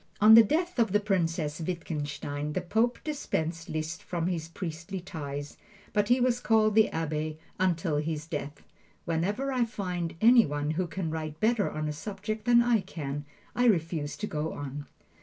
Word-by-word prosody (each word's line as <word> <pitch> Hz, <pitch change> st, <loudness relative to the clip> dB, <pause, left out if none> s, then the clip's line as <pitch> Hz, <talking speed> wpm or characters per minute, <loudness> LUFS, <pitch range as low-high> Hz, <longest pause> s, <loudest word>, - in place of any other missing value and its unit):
On 215 Hz, +1 st, +8 dB
the 230 Hz, -, +11 dB
death 330 Hz, -, 0 dB
of 225 Hz, -5 st, +2 dB
the 210 Hz, -, +5 dB
Princess 165 Hz, -6 st, 0 dB
Wittgenstein, 150 Hz, -3 st, -3 dB
the 185 Hz, -, -1 dB
Pope 225 Hz, +7 st, +1 dB
dispensed 165 Hz, -, -3 dB
Liszt 155 Hz, +1 st, -3 dB
from 170 Hz, -2 st, -3 dB
his 170 Hz, -3 st, -2 dB
priestly 165 Hz, +2 st, -5 dB
ties, 145 Hz, -6 st, -6 dB, 0.4 s
but 210 Hz, 0 st, +1 dB
he 245 Hz, +1 st, +5 dB
was 245 Hz, -1 st, +2 dB
called 220 Hz, -3 st, +3 dB
the 220 Hz, 0 st, +5 dB
Abbe 155 Hz, -1 st, -2 dB, 0.2 s
until 165 Hz, -4 st, +1 dB
his 155 Hz, 0 st, -2 dB
death. 145 Hz, -3 st, -5 dB, 0.4 s
Whenever 200 Hz, +11 st, -1 dB
I 255 Hz, -2 st, +2 dB
find 180 Hz, -7 st, -3 dB
any 235 Hz, +1 st, +7 dB
one 145 Hz, +1 st, -2 dB
who 175 Hz, +3 st, -1 dB
can 165 Hz, 0 st, -3 dB
write 155 Hz, -1 st, -4 dB
better 220 Hz, -2 st, +2 dB
on 155 Hz, 0 st, -3 dB
a 150 Hz, -, -2 dB
subject 215 Hz, +6 st, -5 dB
than 240 Hz, 0 st, +6 dB
I 240 Hz, -2 st, +3 dB
can, 145 Hz, -6 st, -5 dB, 0.3 s
I 245 Hz, -, +2 dB
refuse 165 Hz, -8 st, +1 dB
to 210 Hz, -, -3 dB
go 155 Hz, -4 st, -3 dB
on. 145 Hz, 0 st, -6 dB
170 Hz, 175 wpm, -29 LUFS, 155-215 Hz, 0.4 s, the